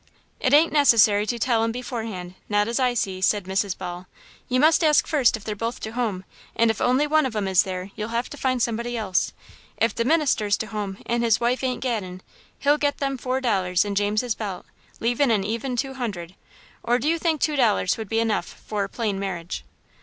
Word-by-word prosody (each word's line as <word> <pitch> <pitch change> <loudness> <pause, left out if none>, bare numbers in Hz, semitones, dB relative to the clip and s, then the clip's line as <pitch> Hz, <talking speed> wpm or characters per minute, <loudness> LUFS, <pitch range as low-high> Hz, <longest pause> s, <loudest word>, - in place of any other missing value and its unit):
"'T 255 - +2
ain't 315 +2 +4
necessary 215 -8 +5
to 240 - -1
tell 230 -1 +1
'em 225 - 0
beforehand, 225 -7 -5 0.2
not 205 0 +2
as 235 +3 -1
I 250 -2 +2
see," 190 -4 -2
said 205 +1 +2
Mrs. 190 +1 -1
Ball. 180 0 -7 0.4
"You 255 0 +2
must 315 +4 +4
ask 305 -2 +4
fust 270 -7 +2
if 215 - -14
they're 210 -1 -4
both 230 +3 -3
to 220 - -5
home, 225 -6 -2 0.3
and 230 -1 +4
if 225 - -6
only 255 +4 +3
one 305 -1 +3
of 235 - -8
'em 205 -2 -1
is 190 -2 +5
there, 185 0 -5
you'll 215 +1 -4
have 235 +2 -1
to - - -6
find 255 -4 0
somebody 235 +1 -2
else. 195 -5 0 0.5
If 225 -2 +1
the 230 - -1
minister's 260 -8 +2
to - - -3
home 205 -2 -5
and 235 0 0
his 230 -2 +3
wife 245 +2 0
ain't 255 -1 -1
gaddin', 190 -7 -3 0.3
he'll 290 +1 +2
get 290 -1 0
them 275 -1 -1
four 255 +1 -2
dollars 190 -6 +1
in 205 - -2
James's 210 +4 0
belt, 200 -5 -6 0.3
leavin' 245 +4 +1
an 215 -4 +2
even 230 +5 -3
two 265 +2 -2
hundred, 195 -9 -5 0.5
or 240 +1 +2
do 255 - -2
you 330 +1 +2
think 320 -2 0
two 305 +1 +1
dollars 220 -8 +2
would 220 -3 -7
be 225 - +1
enough 225 -2 0 0.2
for 210 -2 -1
a 195 - -5
plain 210 -4 -2
marriage?" 185 -3 -4
230 Hz, 220 wpm, -24 LUFS, 200-255 Hz, 0.5 s, necessary